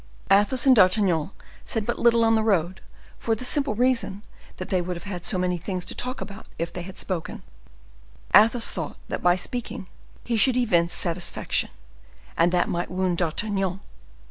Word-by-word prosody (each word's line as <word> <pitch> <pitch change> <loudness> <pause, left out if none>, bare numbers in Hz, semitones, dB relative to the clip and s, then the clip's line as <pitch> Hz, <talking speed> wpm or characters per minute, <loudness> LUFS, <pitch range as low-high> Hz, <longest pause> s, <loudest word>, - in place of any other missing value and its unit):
Athos 205 +7 +3
and 265 -2 +7
D'Artagnan 185 -5 +3 0.3
said 225 -2 -2
but 240 - -2
little 235 -1 +4
on 225 - +4
the 220 - +3
road, 190 -4 0 0.4
for 225 - 0
the 250 - -5
simple 280 -4 +1
reason 230 -4 +1 0.3
that - - -7
they 185 -3 +1
would 180 +1 -4
have - - -11
had 185 -3 -6
so 185 - -1
many 180 -1 -1
things 180 +1 -4
to - - -5
talk 255 +2 -5
about 205 +1 -9
if 170 +1 -4
they 180 - -5
had 185 +2 -10
spoken. 180 -4 -4 0.9
Athos 225 +3 +5
thought 160 -4 -5
that - - -3
by 175 0 +4
speaking 205 +2 -5 0.4
he 235 -2 -1
should 250 +3 +3
evince 175 -8 +2
satisfaction, 175 0 -1 0.7
and 170 +1 +3
that 175 -1 +2
might 175 0 -2
wound 180 -1 -1
D'Artagnan. 190 +2 -1
195 Hz, 175 wpm, -24 LUFS, 175-225 Hz, 0.9 s, and